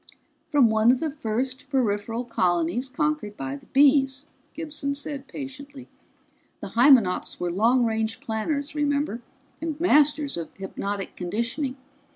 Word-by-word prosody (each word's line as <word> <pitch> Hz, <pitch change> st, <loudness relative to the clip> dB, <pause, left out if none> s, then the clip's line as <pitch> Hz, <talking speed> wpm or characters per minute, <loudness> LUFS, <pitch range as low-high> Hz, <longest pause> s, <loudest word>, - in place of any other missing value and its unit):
"From 265 Hz, -6 st, +4 dB
one 220 Hz, +2 st, +5 dB
of 255 Hz, -, +1 dB
the 315 Hz, -2 st, -2 dB
first 260 Hz, +1 st, -3 dB
peripheral 230 Hz, -2 st, 0 dB
colonies 180 Hz, +3 st, 0 dB
conquered 300 Hz, -7 st, -2 dB
by 135 Hz, 0 st, -4 dB
the 140 Hz, -, -13 dB
Bees," 275 Hz, 0 st, +3 dB, 0.3 s
Gibson 300 Hz, -3 st, -3 dB
said 285 Hz, -1 st, -5 dB
patiently. 275 Hz, -1 st, -8 dB, 0.7 s
"The -, -, -7 dB
Hymenops 235 Hz, -6 st, +4 dB
were 175 Hz, -1 st, -1 dB
long 235 Hz, +7 st, +3 dB
range 220 Hz, 0 st, -1 dB
planners, 280 Hz, +4 st, -2 dB
remember, 285 Hz, -4 st, 0 dB, 0.4 s
and 320 Hz, -2 st, -3 dB
masters 300 Hz, -, +3 dB
of 165 Hz, -, -5 dB
hypnotic 195 Hz, +1 st, -5 dB
conditioning. 235 Hz, -, -3 dB
260 Hz, 130 wpm, -25 LUFS, 220-285 Hz, 0.7 s, one